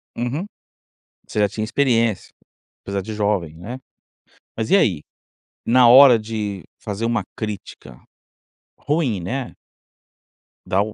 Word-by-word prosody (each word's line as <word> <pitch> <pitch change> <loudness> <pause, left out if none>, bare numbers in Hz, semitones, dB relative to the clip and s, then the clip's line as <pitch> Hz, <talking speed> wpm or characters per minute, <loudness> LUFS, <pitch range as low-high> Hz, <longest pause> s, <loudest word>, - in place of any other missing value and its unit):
Uhum. 125 +9 -3 0.8
Você - - -3
já 105 -1 +3
tinha 110 - -4
experiência, 115 -4 +1 0.5
apesar 100 0 -3
de 110 +3 -7
jovem, 100 -7 -1
né? 115 +10 -7 0.8
Mas 110 -1 -3
e - - +6
aí? 95 - +2 0.7
Na 125 +1 +5
hora 125 -1 +8
de 105 -4 -5 0.2
fazer 105 +2 -4
uma 115 -3 0
crítica 105 - -7 0.8
ruim, 145 - -1
né 125 +8 -4 1.1
dá 95 +2 +1
o 105 0 -3
110 Hz, 120 wpm, -21 LUFS, 100-120 Hz, 1.1 s, hora